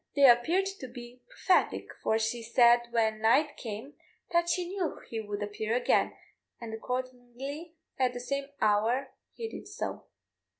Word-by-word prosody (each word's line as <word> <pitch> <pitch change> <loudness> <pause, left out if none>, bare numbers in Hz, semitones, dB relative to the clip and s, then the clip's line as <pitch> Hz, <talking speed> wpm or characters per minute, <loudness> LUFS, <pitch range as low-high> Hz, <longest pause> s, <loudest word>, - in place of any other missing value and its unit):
They 280 -1 +7
appeared 290 +11 +5
to 260 - -6
be 245 0 -11
prophetic, 370 - +1
for 220 - +2
she 225 +2 -1
said 240 +1 +5
when 220 -2 +1
night 280 +7 +4
came 225 +4 -7 0.4
that 340 0 +2
she 360 0 0
knew 370 -2 -3
he 225 - -4
would 205 -1 -4
appear 215 +2 -2
again; 245 - +2 0.4
and 230 -2 -7
accordingly 255 +6 -5 0.2
at 255 -1 +2
the 245 - -5
same 275 +3 -3
hour 225 +6 +2 0.2
he 460 - -4
did - - -9
so. - - -5
245 Hz, 155 wpm, -30 LUFS, 225-280 Hz, 0.4 s, They